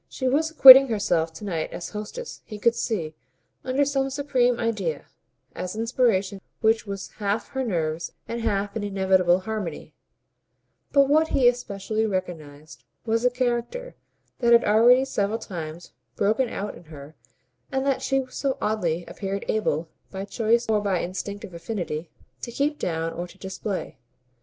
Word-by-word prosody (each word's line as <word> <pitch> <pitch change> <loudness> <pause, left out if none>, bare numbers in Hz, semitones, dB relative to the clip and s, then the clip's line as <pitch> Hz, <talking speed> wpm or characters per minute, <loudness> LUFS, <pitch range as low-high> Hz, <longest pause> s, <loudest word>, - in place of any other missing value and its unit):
She 260 - -3
was 300 +5 +2
acquitting 270 -3 +10
herself 200 -8 0
to 160 +6 -9
night 165 -5 -3
as 170 - -6
hostess, 220 - -7
he 215 - -9
could 230 +3 +3
see, 215 -9 -3 0.5
under 265 +2 +1
some 270 -1 0
supreme 260 -3 +1
idea, 200 -10 -2 0.5
an - - -4
inspiration 220 -4 0 0.2
which 220 -1 +2
was 195 -1 -6
half 205 +1 -1
her 265 -1 -2
nerves 165 -6 -2 0.2
and 235 0 -4
half 205 -2 -1
an 220 - -3
inevitable 190 -2 +2
harmony; 200 -6 -5 1.0
but 280 -1 +5
what 310 +3 +3
he 260 -5 +3
especially 220 -2 -1
recognised 160 -6 -6 0.2
was 225 0 +1
the 250 - +3
character 250 - -2 0.5
that 235 -2 +4
had 235 - +6
already 240 +5 +5
several 210 -4 -1
times 170 -5 -8 0.2
broken 225 +5 +1
out 205 +1 -4
in 175 - -14
her 150 -1 -11 0.6
and 265 0 -1
that 275 -2 +1
she 270 -1 0
so 270 +1 -2
oddly 175 -6 -1
appeared 195 0 -5
able, 170 -7 0 0.2
by 195 0 -6
choice 230 +3 +1
or 215 -1 +2
by 200 -3 0
instinctive 200 +3 -5
affinity, 170 -3 -5 0.3
to 240 - -6
keep 290 +5 -1
down 165 -1 -2
or 175 +1 -5
to 190 - -17
display. 190 +1 -5
215 Hz, 155 wpm, -25 LUFS, 185-245 Hz, 1.0 s, acquitting